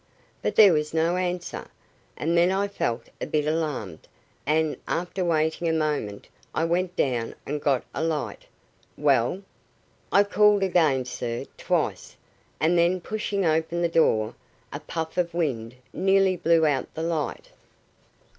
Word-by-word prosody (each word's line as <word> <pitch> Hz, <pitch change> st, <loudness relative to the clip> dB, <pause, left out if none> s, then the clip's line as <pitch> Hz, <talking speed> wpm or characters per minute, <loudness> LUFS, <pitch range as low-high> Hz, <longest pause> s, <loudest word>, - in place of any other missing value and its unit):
but -, -, -1 dB
there 205 Hz, -5 st, +8 dB
was 150 Hz, 0 st, -1 dB
no 165 Hz, +2 st, +2 dB
answer, 180 Hz, -1 st, -3 dB, 0.5 s
and 165 Hz, +3 st, 0 dB
then 170 Hz, +2 st, +4 dB
I 195 Hz, +1 st, +1 dB
felt 120 Hz, -12 st, -2 dB, 0.2 s
a -, -, -2 dB
bit 150 Hz, -1 st, 0 dB
alarmed, 150 Hz, -, -3 dB, 0.4 s
and, 155 Hz, +1 st, +2 dB
after 180 Hz, +2 st, -2 dB
waiting 160 Hz, 0 st, +1 dB
a -, -, +1 dB
moment, 150 Hz, -10 st, -2 dB, 0.3 s
I 160 Hz, -, +1 dB
went 180 Hz, +2 st, 0 dB
down 120 Hz, -8 st, -1 dB
and 150 Hz, +1 st, -3 dB
got 135 Hz, -4 st, +1 dB
a -, -, -2 dB
light." 160 Hz, -2 st, -3 dB, 0.5 s
"Well?" 140 Hz, +5 st, +2 dB, 0.7 s
"I 200 Hz, -, +6 dB
called 205 Hz, 0 st, +4 dB
again, 155 Hz, -9 st, +2 dB
sir, 120 Hz, -1 st, -4 dB
twice; -, -, -2 dB, 0.4 s
and 170 Hz, +2 st, +3 dB
then, 175 Hz, +2 st, +3 dB
pushing 200 Hz, 0 st, -2 dB
open 160 Hz, +2 st, +1 dB
the 170 Hz, -, +2 dB
door, 110 Hz, -10 st, +2 dB, 0.4 s
a -, -, -4 dB
puff 160 Hz, +1 st, -4 dB
of 170 Hz, -1 st, -1 dB
wind 125 Hz, -8 st, -2 dB, 0.2 s
nearly 195 Hz, 0 st, +3 dB
blew 165 Hz, -2 st, +3 dB
out 140 Hz, -4 st, 0 dB
the 160 Hz, -, -3 dB
light." 165 Hz, -3 st, -3 dB
165 Hz, 145 wpm, -25 LUFS, 150-180 Hz, 0.7 s, there